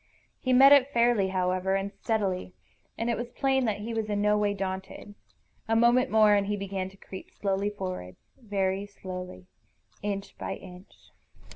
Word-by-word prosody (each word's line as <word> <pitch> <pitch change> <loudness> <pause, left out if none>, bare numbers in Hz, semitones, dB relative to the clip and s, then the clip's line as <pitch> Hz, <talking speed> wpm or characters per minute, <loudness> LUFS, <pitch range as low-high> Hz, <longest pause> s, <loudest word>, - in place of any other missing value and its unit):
He 255 - -1
met 270 +2 +8
it 280 -1 +6
fairly, 235 -5 +3
however, 185 0 0
and 195 +1 -2
steadily, 195 -5 -2 0.4
and 230 - -2
it 235 - +1
was 240 +2 -5
plain 265 0 +1
that 210 -2 -1
he 230 +2 -4
was 220 -1 -2
in 205 -1 0
no 210 0 +3
way 205 -1 +1
daunted. 190 +1 -5 0.5
A 225 - +2
moment 240 +3 +4
more 215 -1 +5
and 200 -1 +2
he 205 0 -1
began 195 -1 -4
to 195 - -19
creep 190 -1 -10
slowly 200 0 -1
forward, 185 - -6 0.2
very 200 -3 -2
slowly, 185 -2 -8 0.6
inch 200 -1 -4
by - - -3
inch. 180 +1 -14
205 Hz, 170 wpm, -28 LUFS, 190-225 Hz, 0.6 s, met